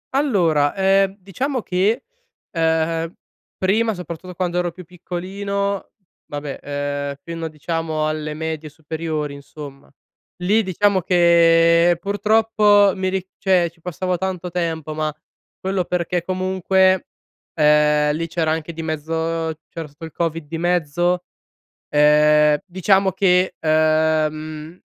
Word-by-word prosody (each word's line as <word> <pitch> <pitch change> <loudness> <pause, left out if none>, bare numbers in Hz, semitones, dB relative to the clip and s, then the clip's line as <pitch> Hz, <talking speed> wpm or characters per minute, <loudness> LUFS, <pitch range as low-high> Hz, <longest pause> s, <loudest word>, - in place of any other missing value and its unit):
Allora, 170 - +2
ehm, 195 0 +2
diciamo 245 - -3
che, 205 +7 +1 0.5
ehm, 165 0 0 0.5
prima 215 +3 +1
soprattutto 180 0 -8
quando 180 -1 -1
ero 175 -1 -1
più 180 0 -12
piccolino 195 +3 -4 0.4
vabbè, 145 -1 -5
ehm, 145 0 -3
fino 165 -1 -5
diciamo 155 0 -2
alle 155 0 -3
medie, 160 -1 -4
superiori 155 -1 -4
insomma. 140 0 -11 0.5
Lì, 210 +5 +3
diciamo 195 0 +1
che 170 -1 +4
purtroppo 205 0 +3
mi 190 0 -1
ri 190 -1 -3
cioè, 180 -3 +2
ci 165 -1 -29
passavo 180 +1 -2
tanto 185 -2 -3
tempo, 160 -3 -2
ma 155 0 -1 0.5
quello 190 -1 -1
perché 175 -1 -1
comunque, 185 0 +1 0.5
ehm, 150 -1 +4
lì 165 +1 -3
c'era 160 -1 0
anche 160 +1 -3
di 165 0 -6
mezzo 160 +1 -2
c'era 165 -2 -6
stato 150 +3 -11
il 160 - -9
covid 165 -1 -2
di 165 +1 -5
mezzo, 175 +1 +1 0.7
ehm, 150 0 +5
diciamo 190 +1 +2
che, 185 -1 +2
ehm, 155 +1 0
170 Hz, 120 wpm, -21 LUFS, 155-185 Hz, 0.7 s, ehm